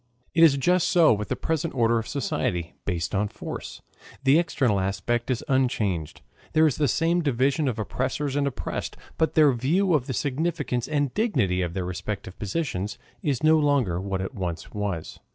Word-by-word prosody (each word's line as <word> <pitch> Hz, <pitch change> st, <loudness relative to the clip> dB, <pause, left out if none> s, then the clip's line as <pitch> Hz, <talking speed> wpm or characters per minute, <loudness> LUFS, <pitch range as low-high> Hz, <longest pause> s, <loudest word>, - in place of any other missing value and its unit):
It 165 Hz, -, +5 dB
is 145 Hz, -4 st, +6 dB
just 180 Hz, +6 st, +2 dB
so 170 Hz, -7 st, +5 dB
with 105 Hz, 0 st, -3 dB
the -, -, -1 dB
present 160 Hz, -1 st, -2 dB
order 115 Hz, -1 st, +3 dB
of 115 Hz, -, -6 dB
society, 90 Hz, -, -2 dB
based 90 Hz, -2 st, -2 dB
on 105 Hz, +1 st, +1 dB
force. -, -, -7 dB, 0.4 s
The 140 Hz, +4 st, +5 dB
external 130 Hz, -, +1 dB
aspect 115 Hz, +6 st, -1 dB
is 125 Hz, -3 st, -1 dB
unchanged. 105 Hz, -, 0 dB, 0.3 s
There 155 Hz, 0 st, +5 dB
is 145 Hz, -5 st, +1 dB
the 150 Hz, -, +2 dB
same 170 Hz, +5 st, +2 dB
division 140 Hz, +1 st, +1 dB
of 120 Hz, -4 st, -1 dB
oppressors 130 Hz, +5 st, -2 dB
and 145 Hz, -1 st, +1 dB
oppressed, 135 Hz, -, -4 dB, 0.2 s
but 160 Hz, -, +1 dB
their 150 Hz, -4 st, +6 dB
view 170 Hz, +10 st, +1 dB
of 140 Hz, -4 st, +1 dB
the 130 Hz, -, -2 dB
significance 145 Hz, -2 st, -1 dB
and 145 Hz, -4 st, 0 dB
dignity 125 Hz, -, +1 dB
of 85 Hz, -1 st, -3 dB
their 95 Hz, -2 st, -2 dB
respective 90 Hz, +1 st, -5 dB
positions 105 Hz, -, -3 dB, 0.2 s
is 140 Hz, -3 st, -1 dB
no 155 Hz, 0 st, +5 dB
longer 135 Hz, -, +1 dB
what 95 Hz, -1 st, -2 dB
it 95 Hz, -, -4 dB
once 85 Hz, -4 st, -4 dB
was. 100 Hz, -6 st, -4 dB
130 Hz, 180 wpm, -25 LUFS, 100-155 Hz, 0.4 s, is